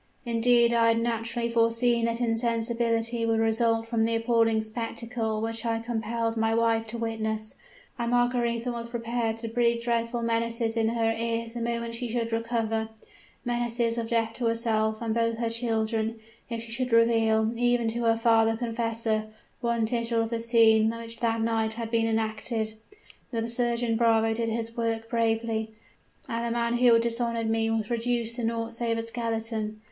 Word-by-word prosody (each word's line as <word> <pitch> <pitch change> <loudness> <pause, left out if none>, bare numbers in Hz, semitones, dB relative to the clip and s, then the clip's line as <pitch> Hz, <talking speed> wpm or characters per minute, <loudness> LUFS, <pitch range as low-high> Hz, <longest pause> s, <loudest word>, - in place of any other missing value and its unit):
Indeed 235 0 +4
I 230 -1 +4
had 230 0 +3
naturally 235 0 -1
foreseen 230 0 +2
that 230 0 -1
insensibility 230 0 0
would 225 0 +2
result 225 0 +2
from 230 -1 0
the 230 0 +1
appalling 225 -1 +2
spectacle 230 0 -3
which 225 0 -2
I 230 -1 0
compelled 230 0 -2
my 225 0 +1
wife 225 -1 +2
to 230 +2 -5
witness: 220 -1 -3 0.5
and 235 0 -1
Margaretha 245 0 +1
was 235 0 -5
prepared 230 -1 -2
to 230 0 -6
breathe 235 0 +1
dreadful 235 0 -1
menaces 230 0 0
in 225 -1 +2
her 225 -1 +1
ears 230 0 -2
the 240 - -5
moment 235 0 -2
she 235 +1 -4
should 230 0 -2
recover 225 -1 -1 0.6
menaces 240 -1 0
of 230 -1 -3
death 225 -1 +1
to 240 - 0
herself 220 -1 0
and 225 -1 -1
both 230 0 0
her 230 -1 -1
children 225 -1 -1 0.3
if 230 -1 -4
she 230 - -10
should 250 +2 -2
reveal, 225 -1 +4
even 240 0 +2
to 235 +1 -2
her 225 0 +3
father 225 -1 +3
confessor, 225 -2 -1 0.3
one 235 -2 0
tittle 230 0 0
of 225 - -5
the 230 - -1
scene 225 -1 +4
which 230 0 -7
that 230 -1 0
night 225 -1 0
had 230 -1 -5
been 225 -1 +2
enacted! 220 0 -1 0.6
The 230 -2 -2
surgeon 235 -1 0
bravo 225 -1 +3
did 230 0 -1
his 230 0 -3
work 225 -1 -2
bravely; 225 -1 0 0.5
and 230 0 -2
the 235 - -1
man 235 0 0
who 245 -1 +6
had 230 0 +4
dishonored 230 -1 -1
me 225 0 +1
was 225 0 -1
reduced 235 0 0
to 240 - -3
naught 230 0 -2
save 230 -1 -1
a 225 - -1
skeleton! 225 -2 -3
230 Hz, 170 wpm, -27 LUFS, 225-235 Hz, 0.6 s, who